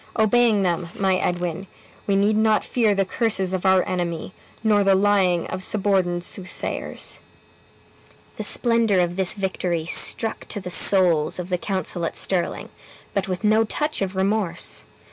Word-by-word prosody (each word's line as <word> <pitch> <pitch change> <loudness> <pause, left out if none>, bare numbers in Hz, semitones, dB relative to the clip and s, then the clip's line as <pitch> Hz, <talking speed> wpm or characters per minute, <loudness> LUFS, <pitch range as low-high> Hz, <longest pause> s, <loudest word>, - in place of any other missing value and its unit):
Obeying 220 -1 +3
them, 175 -1 -1
my 190 -1 +1
Edwin, 175 +1 -3 0.4
we 200 - +1
need 205 +2 +2
not 215 0 +2
fear 220 -4 +1
the 195 0 +1
curses 190 -2 -1
of 185 0 -1
our 190 -1 +3
enemy, 175 -1 -4 0.3
nor 210 -2 +3
the 195 -1 +3
lying 190 -3 +2
of 185 - -5
suborned 185 -3 0
soothsayers." 185 +1 -5 1.2
The - - -4
splendor 230 -5 +2
of 175 0 0
this 190 -1 +3
victory 180 -4 -3
struck 220 +5 +2
to - - -4
the 180 -2 -7
souls 175 -5 +5
of 180 0 -6
the 180 - 0
council 185 -3 -4
at 165 - -3
Stirling, 185 -3 -1 0.4
but 200 +1 -2
with 185 +2 -4
no 215 +1 +3
touch 300 +6 -2
of 195 -1 -3
remorse. 195 -1 -1
190 Hz, 155 wpm, -22 LUFS, 180-210 Hz, 1.2 s, souls